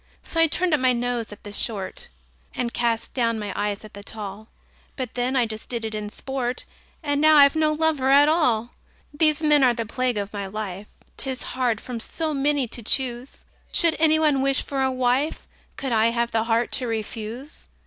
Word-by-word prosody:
So 330 - -3
I 330 - +6
turned 350 +2 0
up 300 - +3
my 255 -1 +3
nose 240 -2 -2
at 210 - -12
the 205 - -8
short, 230 - -3 0.5
And 235 -1 -2
cast 235 -1 -1
down 230 -3 +1
my 205 -2 -4
eyes 205 +1 -2
at 215 - -13
the 200 - -9
tall; 210 0 -7 0.5
But 255 -4 -5
then 250 +2 -1
I 250 -2 +3
just 220 -1 -8
did 235 -2 -3
it 220 - -4
in 210 -1 -4
sport 250 +2 -4 0.4
And 290 -1 0
now 310 0 +6
I've 280 +1 +7
no 310 -1 +3
lover 305 -4 +1
at 285 +2 +7
all! 245 -8 +2 0.4
These 310 0 +2
men 300 -2 +5
are 245 -2 +4
the 230 -1 -3
plague 250 +1 -1
of 200 +1 -3
my 200 -1 -4
life: 200 -1 -6 0.3
'Tis 265 -2 -3
hard 245 -4 0
from 245 -1 -6
so 315 +7 -3
many 280 -1 +1
to 235 - -7
choose! 245 +2 -1 0.3
Should 335 -4 +4
any 315 -1 +5
one 300 -4 +3
wish 275 0 +3
for 275 -1 -3
a 265 - +2
wife, 255 +3 0 0.3
Could 270 -2 -3
I 225 -1 +4
have 235 0 0
the 225 0 +1
heart 230 +1 +1
to 255 -2 -1
refuse? 225 +4 -5
250 Hz, 205 wpm, -24 LUFS, 225-285 Hz, 0.5 s, I've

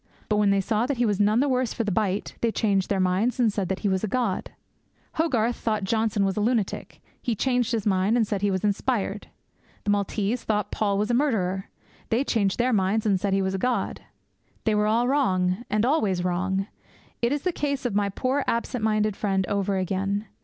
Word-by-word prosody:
But 210 - +2
when 210 -1 +3
they 200 0 +3
saw 220 +4 0
that 280 -2 -1
he 240 - +2
was 205 -3 0
none 210 +4 +3
the 285 - +2
worse 255 -3 0
for 230 - 0
the 210 - -1
bite, 200 0 -1
'they 230 -2 +1
changed 195 -3 +1
their 195 - +1
minds, 190 +7 +1
and 225 -4 +3
said 195 -4 -2
that 190 - -2
he 210 - 0
was 190 0 0
a - - +1
god!' 230 -3 -1 0.7
Hogarth 245 -8 +1
thought 215 -2 -1
Johnson 215 0 +1
was 195 -1 0
a 210 - -1
lunatic. 220 -2 -1 0.2
He 235 - -1
changed 250 +1 +1
his 225 -4 -1
mind, 200 +3 +2
and 230 - +3
said 205 -2 -2
he 205 - +2
was 190 0 -1
inspired! 210 -1 -1 0.6
The 205 - +1
Maltese 205 +3 -1
thought 210 -2 -1
Paul 200 -2 0
was 210 +4 0
a - - +1
murderer. 195 -9 0 0.4
They 235 +4 +2
changed 205 -8 0
their 245 +1 +2
minds, 210 +2 +1
and 195 -3 +2
said 200 +1 -1
he 195 0 +2
was 190 0 -1
a 190 - -2
god! 250 +3 -1 0.6
They 220 - +2
were 210 0 +2
all 230 +3 +2
wrong, 190 -6 +1
and 215 +2 +1
always 210 - +1
wrong. 185 +2 0 0.6
It 235 +1 +2
is 290 0 -1
the 365 - +1
case 280 -5 -2
of 240 - 0
my 200 0 +1
poor 260 +7 -1
absent 235 0 -1
minded 215 -1 +1
friend 195 -2 0
over 200 0 0
again. 195 +2 -1
210 Hz, 220 wpm, -25 LUFS, 195-235 Hz, 0.7 s, when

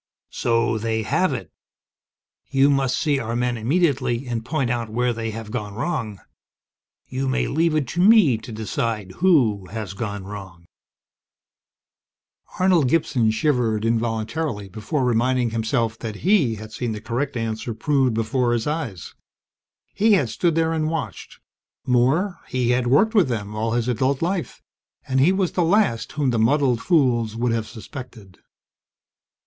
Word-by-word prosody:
"So 115 -1 +1
they 110 0 -1
have - - +1
it! - - -5 1.0
You 140 +1 +4
must 135 -2 +1
see 145 -3 +1
our 115 -1 -3
men 120 0 0
immediately, 130 -1 0
and 120 -2 -3
point 135 -1 -1
out 120 -2 -2
where 120 +2 0
they 115 0 -4
have 110 -1 -7
gone 105 -2 -4
wrong. 115 - -3 0.9
You 135 +1 -3
may 130 +1 +1
leave 160 +2 +1
it 150 -4 0
to 175 - -1
me 190 - +6
to 115 - -10
decide 110 -2 -3
who 125 - +3
has 110 -3 -6
gone 100 -1 -4
wrong!" 95 -4 -9 1.9
Arnold 180 -8 +3
Gibson 130 -7 +2
shivered 115 -3 +1
involuntarily 115 +1 -1
before 110 - -2
reminding 125 0 +1
himself 115 0 -1
that 110 -3 -5
he 175 - +3
had 110 0 -9
seen 115 0 -3
the 105 - -5
correct 125 +5 -3
answer 115 0 -3
proved 130 0 +1
before 120 +2 0
his 115 -2 -1
eyes. 145 - -4 0.8
He 215 +1 +3
had 195 - +2
stood 170 -3 0
there 165 0 +1
and 155 -1 0
watched 165 0 -5 0.5
more, 135 +10 +2
he 125 -1 0
had 125 0 +1
worked 195 - +4
with 200 -8 +4
them 105 -4 -3
all 110 +1 -1
his 120 0 0
adult 130 +4 0
life 175 - -3 0.4
and 130 0 +1
he 150 +7 +5
was 190 -2 0
the 180 - 0
last 165 - +1
whom 140 -3 0
the 115 - 0
muddled 125 0 +2
fools 120 -10 +2
would 120 +1 0
have 115 -1 -1
suspected. 110 -4 -10
120 Hz, 155 wpm, -22 LUFS, 110-145 Hz, 1.9 s, me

